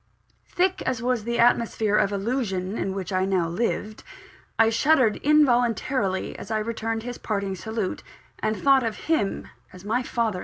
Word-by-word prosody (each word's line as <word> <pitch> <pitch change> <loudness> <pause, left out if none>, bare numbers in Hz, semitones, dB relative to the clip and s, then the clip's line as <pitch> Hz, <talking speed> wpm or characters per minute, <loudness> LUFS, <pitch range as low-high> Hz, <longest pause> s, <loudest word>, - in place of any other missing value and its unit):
Thick 370 +1 0
as 255 -3 -1
was 240 -2 -1
the 235 0 -1
atmosphere 230 -3 +2
of 205 -1 +2
illusion 200 -3 -2
in 190 -3 -2
which 190 -1 -4
I 185 0 +2
now 190 -3 +1
lived, 215 +3 -2 0.5
I 225 0 +4
shuddered 250 -2 +3
involuntarily 245 -7 +2
as - - -9
I 220 - 0
returned 225 0 -3
his 245 0 -6
parting 200 -3 -2
salute, 220 0 -4 0.4
and 215 0 -1
thought 275 -1 +4
of 225 -2 -2
him 265 -12 0 0.2
as 185 +1 -13
my 230 +4 0
father 235 -2 -1
in - - -5
law! 180 - -5
225 Hz, 175 wpm, -25 LUFS, 200-245 Hz, 0.5 s, I